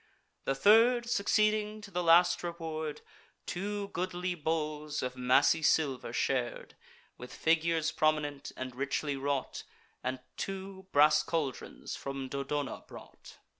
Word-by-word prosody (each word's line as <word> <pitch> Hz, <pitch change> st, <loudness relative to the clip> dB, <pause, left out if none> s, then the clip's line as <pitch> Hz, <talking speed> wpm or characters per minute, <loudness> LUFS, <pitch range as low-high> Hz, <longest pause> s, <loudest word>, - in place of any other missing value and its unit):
The 135 Hz, -, +1 dB
third, 230 Hz, -, +5 dB
succeeding 215 Hz, -1 st, +1 dB
to 205 Hz, -1 st, -11 dB
the 180 Hz, -1 st, -1 dB
last 175 Hz, +1 st, +5 dB
reward, 160 Hz, -3 st, -4 dB, 0.4 s
Two 200 Hz, +2 st, -3 dB
goodly 180 Hz, -1 st, -2 dB
bowls 155 Hz, -2 st, -2 dB
of 125 Hz, 0 st, -3 dB
massy 130 Hz, +5 st, +4 dB
silver 140 Hz, -6 st, +1 dB
shar'd, 125 Hz, 0 st, -2 dB, 0.4 s
With 125 Hz, -, -9 dB
figures 160 Hz, 0 st, +1 dB
prominent, 150 Hz, -2 st, 0 dB
and 130 Hz, -1 st, -5 dB
richly 140 Hz, +2 st, -1 dB
wrought, 135 Hz, -1 st, -2 dB, 0.4 s
And 130 Hz, 0 st, -2 dB, 0.2 s
two 190 Hz, 0 st, -6 dB
brass 150 Hz, +1 st, +6 dB
caldrons 150 Hz, -4 st, -4 dB
from 135 Hz, -1 st, -5 dB
Dodona 140 Hz, +1 st, -3 dB
brought. -, -, -13 dB
155 Hz, 120 wpm, -31 LUFS, 140-180 Hz, 0.4 s, brass